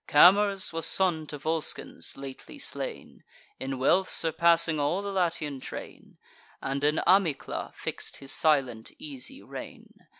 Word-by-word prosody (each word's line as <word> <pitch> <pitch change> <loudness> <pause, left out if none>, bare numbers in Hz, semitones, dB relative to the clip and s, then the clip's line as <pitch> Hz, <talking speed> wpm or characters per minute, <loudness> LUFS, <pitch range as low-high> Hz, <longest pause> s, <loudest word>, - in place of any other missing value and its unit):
Camers 195 +4 +5
was 165 0 0
son 170 -5 +1
to 150 - -6
Volscens 160 0 -3
lately 135 -1 -9
slain, - - -6 0.4
In 135 0 -3
wealth 180 +9 +3
surpassing 165 0 +3
all 160 +7 0
the 200 - -3
Latian 165 -7 -1
train, - - -9 0.4
And 140 +1 -3
in 150 +2 +3
Amycla 185 -6 +1
fix'd - - -4
his 135 -1 -4
silent 135 -8 +1
easy 275 -2 -6
reign. - - -11
160 Hz, 130 wpm, -28 LUFS, 140-185 Hz, 0.4 s, Camers